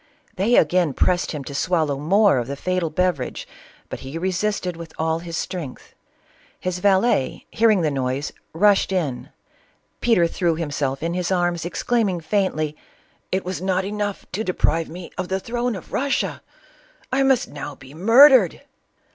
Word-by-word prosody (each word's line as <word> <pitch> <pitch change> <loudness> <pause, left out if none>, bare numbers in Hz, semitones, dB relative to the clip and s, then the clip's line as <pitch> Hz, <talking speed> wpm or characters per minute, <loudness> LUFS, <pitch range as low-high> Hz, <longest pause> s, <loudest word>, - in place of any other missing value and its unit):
They 210 +6 +2
again 170 -1 +3
pressed 175 +6 +1
him 150 -3 -5
to 140 - -8
swallow 155 -1 +1
more 190 0 +4
of 120 - -3
the 140 - -4
fatal 185 +2 -1
beverage, 165 -6 -1 0.4
but - - -6
he 135 +4 -7
re 185 +3 -1
sisted 185 -2 -1
with 165 -1 -10
all 160 0 0
his 165 -1 -6
strength. 160 -9 -6 0.7
His 185 -1 -3
valet, 190 - +2
hearing 220 -4 +3
the 155 -2 +1
noise, 135 +1 -2 0.2
rushed 200 +3 +3
in. 155 -10 -2 0.7
Peter 225 -8 +3
threw 170 0 0
himse49in 150 0 -2
his 180 0 -2
arras, 175 -2 0
ex 175 - -5
claiming 215 -7 +1
faintly, 160 -4 -1 0.3
" - - -36 0.2
It 190 0 -1
was 180 -3 -4
not 190 0 0
enough 205 0 -3
to 205 +4 -2
deprive 165 -4 0
me 175 +1 -9
of - - -2
the 190 +1 -1
throne 240 +2 -2
of 190 - -10
Russia! 275 +1 -1 0.4
— - - -31
I 270 - +3
must 270 -2 +2
now 145 0 -7
be 130 +1 -14
murdered 230 - +6
180 Hz, 165 wpm, -22 LUFS, 155-200 Hz, 0.7 s, murdered